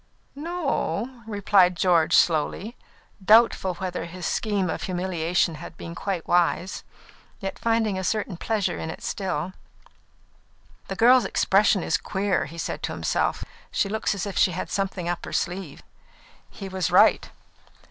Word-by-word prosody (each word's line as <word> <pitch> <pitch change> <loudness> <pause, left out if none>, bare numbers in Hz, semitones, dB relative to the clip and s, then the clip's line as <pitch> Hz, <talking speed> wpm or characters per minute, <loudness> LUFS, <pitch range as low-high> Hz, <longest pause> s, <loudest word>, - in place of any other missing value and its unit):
"No 335 +2 -4
o," 235 +5 -2
replied 200 -4 +3
George 170 -4 +3
slowly, 175 +8 +1 0.5
doubtful 210 -3 +4
whether 180 -2 -4
his 180 +1 -7
scheme 205 -4 0
of 160 - -3
humiliation 180 -2 0
had 170 - -10
been 170 - -7
quite 185 -2 -4
wise, 175 +1 +1 0.6
yet 195 -2 -5
finding 225 -4 +1
a - - -4
certain 205 -1 -1
pleasure 210 +3 -1
in 160 - -4
it - - -8
still. 185 -3 -3 1.3
"The - - -4
girl's 245 0 +5
expression 195 0 +3
is 160 - +1
queer," 190 +1 -1
he 160 +4 -10
said 165 - -4
to - - -3
himself. - - -1 0.2
"She 200 - 0
looks 220 -1 -1
as 195 - -3
if 200 - -3
she 185 - +4
had 180 - -5
something 195 -3 -2
up 175 0 -2
her - - -7
sleeve." 180 -4 -3 0.7
He 195 - -8
was 190 -2 -2
right. - - +4
190 Hz, 150 wpm, -25 LUFS, 175-210 Hz, 1.3 s, girl's